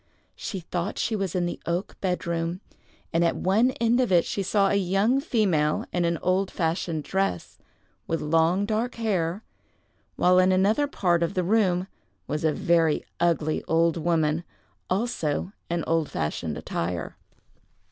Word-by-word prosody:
She 190 -4 -5
thought 175 +3 -3
she 225 - 0
was 195 -4 -2
in 180 -1 +1
the 175 - -4
oak 175 +3 -2
bed 180 -2 -1
room, 170 +1 -2 0.5
and 165 +1 +3
at 170 - +2
one 215 +7 +3
end 235 +1 +3
of 250 -5 +1
it 175 -2 +4
she 200 - -2
saw 195 +1 +2
a - - +1
young 200 +6 +2
female 185 - +1
in 175 -1 +1
an 170 0 +1
old 185 +1 +1
fashioned 165 -2 -2
dress, 190 - -2 0.5
with 165 - -1
long 165 +5 +2
dark 220 +3 -1
hair, 195 -4 -1 0.7
while 180 0 +4
in 185 0 +4
another 205 +10 +3
part 175 -10 +1
of 170 +3 -1
the 185 - +1
room 185 -2 +2 0.4
was 150 - -3
a 160 - +3
very 165 -1 +2
ugly 165 -3 +1
old 165 0 +2
woman, 165 -1 +1 0.5
also 185 -5 -1 0.2
in 170 -1 -1
old 165 -2 0
fashioned 75 -3 -3
attire. 85 +1 -3
175 Hz, 155 wpm, -26 LUFS, 165-195 Hz, 0.7 s, it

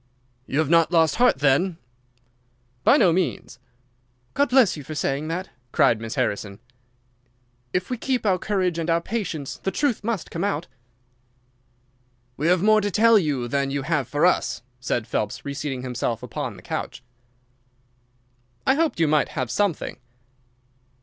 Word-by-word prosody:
"You 140 - -2
have 155 -2 +1
not 165 0 +4
lost 160 -4 +3
heart, 245 - +4
then?" 145 +6 +2 1.1
"By 280 - +6
no 185 - +4
means." 170 -7 -2 0.7
"God 285 -1 +2
bless 250 -6 +4
you 150 - -8
for 155 +2 -7
saying 145 +1 -1
that!" 180 +4 -4 0.2
cried 115 -1 +3
Miss 115 0 -5
Harrison. 100 -1 -2 1.1
"If 180 - -2
we 250 - -2
keep 255 -3 -1
our 185 -3 +2
courage 185 -4 0
and 165 0 -2
our 165 0 +3
patience 170 -8 -4
the - - -1
truth 250 0 -1
must 220 -4 -3
come 170 - -3
out." 175 -5 -1 1.7
"We 150 +5 -1
have 180 +1 +3
more 215 0 +5
to 205 - -1
tell 225 +2 +5
you 140 -8 -1
than 140 +2 0
you 140 0 -2
have 150 -4 0
for 145 +6 +1
us," 180 - +1 0.2
said 120 -2 -2
Phelps, 110 -2 -3
reseating 140 -2 -4
himself 125 -2 -3
upon - - -5
the - - -14
couch. 125 - -5 1.6
"I - - +5
hoped 315 - 0
you 165 - +3
might 150 0 +2
have 125 -2 -1
something." 200 -7 -1
165 Hz, 155 wpm, -24 LUFS, 140-205 Hz, 1.7 s, By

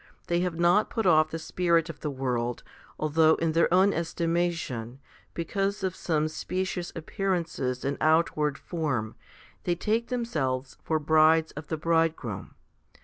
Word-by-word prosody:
They 170 0 +1
have 175 -2 -1
not 175 +5 +3
put 225 -3 -2
off 155 -3 +5
the 165 - -4
spirit 165 0 +1
of 160 -4 -8
the 150 - -3
world, 125 -3 -2 0.3
although 155 +1 +4
in 165 -1 0
their 165 +1 +2
own 190 +3 +5
estimation, 165 -7 -2 0.4
because 195 +4 -2
of 185 -1 -1
some 155 -2 0
specious 180 +2 -3
appearances 165 -8 -2
and 140 +1 -1
outward 155 -2 +2
form, 135 -11 -2 0.5
they 175 - 0
take 220 +6 0
themselves 140 - -2
for 160 - 0
brides 155 +1 +4
of 150 0 -9
the 160 - -2
Bridegroom. 160 - -1
165 Hz, 145 wpm, -27 LUFS, 150-175 Hz, 0.5 s, off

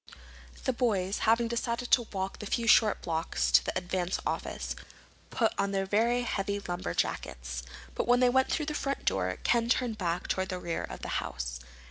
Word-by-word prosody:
The 260 - +1
boys, 205 -6 0
having 230 +1 +4
decided 235 +1 -2
to 240 -3 +5
walk 190 -1 -3
the 210 - -5
few 235 - 0
short 220 -2 +5
blocks 165 -1 0
to - - +6
the - - -2
Advance 180 0 -1
office, - - -3 0.5
put 225 -3 +1
on 200 0 +1
their 195 0 +1 0.4
heavy 200 -3 -1
lumberjackets. 65 - -3 0.3
But - - -2
when 245 0 +5
they 250 -1 +5
went 260 +1 +3
through 310 - 0
the 300 - -2
front 275 -2 -2
door 90 -1 +1
Ken 235 -1 +2
turned 240 -3 +1
back 175 -1 -1
toward 190 0 -1
the 185 - -2
rear 170 -2 -3
of - - -7
the - - -3
house. - - -5
200 Hz, 180 wpm, -30 LUFS, 180-235 Hz, 0.5 s, to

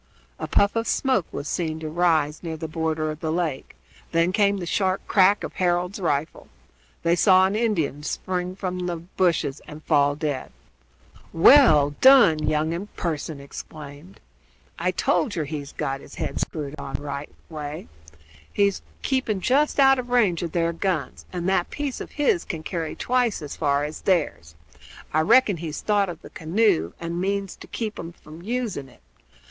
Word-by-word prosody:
A - - -4
puff 200 +2 +2
of 230 0 -1
smoke 260 - +1
was 145 - -5
seen 160 -1 -2
to 155 - -4
rise 160 -2 +1
near 165 -2 -5
the 160 - -5
border 155 0 -1
of 155 - -8
the 160 -1 -2
lake; 160 -5 -2 0.4
then 165 +1 +2
came 200 0 +2
the 180 - -4
sharp 190 +2 0
crack 200 +1 +4
of - - -5
Harold's 180 +2 0
rifle. 155 -4 -2 0.6
They 170 +1 +3
saw 185 +1 +5
an 195 +2 0
Indian 185 - 0
spring 180 +4 -3
from 180 -2 -3
the 175 - -2
bushes 170 -4 -1
and 150 +1 -10
fall 145 0 +3
dead. 145 -3 -3 0.8
"Well 165 - +6
done, 260 - +7
young 155 +1 +1
un!" 180 +5 -4
Pearson 160 -3 -3
exclaimed. 145 +4 -10 0.6
"I - - +1
told 235 - 0
yer 165 - -1
he'd 145 -1 -7
got 135 0 -2
his - - -13
head - - -3
screwed 150 -2 -4
on 135 - -6
the - - -4
right 140 0 -5 0.2
way. 150 - -6 0.6
He's 200 -1 +1 0.2
keeping 260 -7 0
just 280 +9 +2
out 270 -1 +6
of 245 -1 -5
range 215 -9 +2
of 170 -2 -3
their 170 -1 +1
guns, 165 -5 -2
and 180 -1 -3
that 190 -2 +1
piece 290 -3 -4
of - - -8
his 340 +5 +1
can 160 -5 -6
carry 165 -2 -4
twice 245 -3 0
as 145 - -6
far 145 -2 +1
as 150 +1 -5
theirs. 150 - 0 0.6
I 155 - +3
reckon 205 +2 +4
he's 160 -2 -5
thought 205 -2 +1
of 170 -1 -8
the - - -12
canoe, 160 - +1
and 170 +1 -3
means 195 0 -2
to - - -12
keep 220 -2 -4
'em 165 - -6
from 155 0 -13
using 220 - -3
it. - - -22
170 Hz, 175 wpm, -24 LUFS, 155-200 Hz, 0.8 s, done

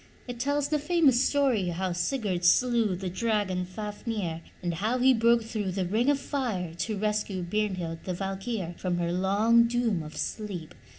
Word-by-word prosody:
It 245 -1 -6
tells 285 +2 0
the 300 0 +1
famous 295 -5 +3
story 265 -10 +2
how 180 +2 -2
Sigurd 185 0 -1
slew 230 +1 +3
the 185 +1 -5
dragon, 190 -2 0
Fafnir, 205 -3 -4 0.2
and 175 -1 -1
how 215 +9 0
he 260 +1 +5
broke 230 0 +3
through 215 -4 -3
the 190 -1 -1
ring 220 +9 +1
of 290 - +3
fire 220 - -2
to 210 +5 -3
rescue 210 -2 -1
Brynhild, 180 -4 -2
the 185 - -2
Valkyr, 195 0 -3
from 180 -2 -1
her 170 -1 -1
long 205 +6 +4
doom 235 -6 0
of 155 0 -9
sleep. 195 -7 -4
210 Hz, 170 wpm, -28 LUFS, 180-235 Hz, 0.2 s, he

